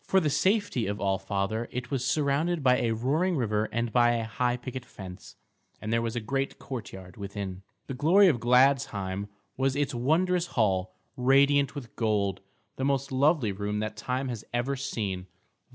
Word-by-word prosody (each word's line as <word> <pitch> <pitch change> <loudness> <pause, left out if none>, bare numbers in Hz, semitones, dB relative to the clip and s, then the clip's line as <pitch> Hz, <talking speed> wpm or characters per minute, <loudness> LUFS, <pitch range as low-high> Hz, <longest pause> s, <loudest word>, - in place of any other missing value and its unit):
For 190 - +3
the 155 -5 0
safety 190 - +1
of 100 +1 -3
All 95 -1 0
Father 100 +4 -2
it 125 -1 -5
was 135 -3 -1
surrounded 150 +4 +1
by 125 -1 +4
a 120 - +1
roaring 145 +11 +1
river 110 -3 0
and 115 0 -2
by 120 -1 +5
a 115 -1 -1
high 120 +2 -1
picket 130 0 -6
fence; 90 -5 -11 0.4
and 110 +1 -3
there 115 - +2
was 115 0 -3
a - - 0
great 135 +5 -2
courtyard 95 -8 -8
within. 100 -2 -5 0.2
The - - -5
glory 175 +10 +5
of 140 -9 +3
Gladsheim 115 -6 +2 0.3
was 135 0 +1
its 145 -1 0
wondrous 170 +8 +1
hall, 95 -4 +1 0.2
radiant 140 +2 +3
with 130 -5 -8
gold, 100 -4 0 0.4
the 130 - -3
most 135 0 0
lovely 135 -3 +3
room 105 +2 -3
that 110 0 -3
time 130 +4 -2
has 115 -3 -5
ever 120 +3 -1
seen. 105 -9 -3
120 Hz, 175 wpm, -28 LUFS, 105-140 Hz, 0.4 s, by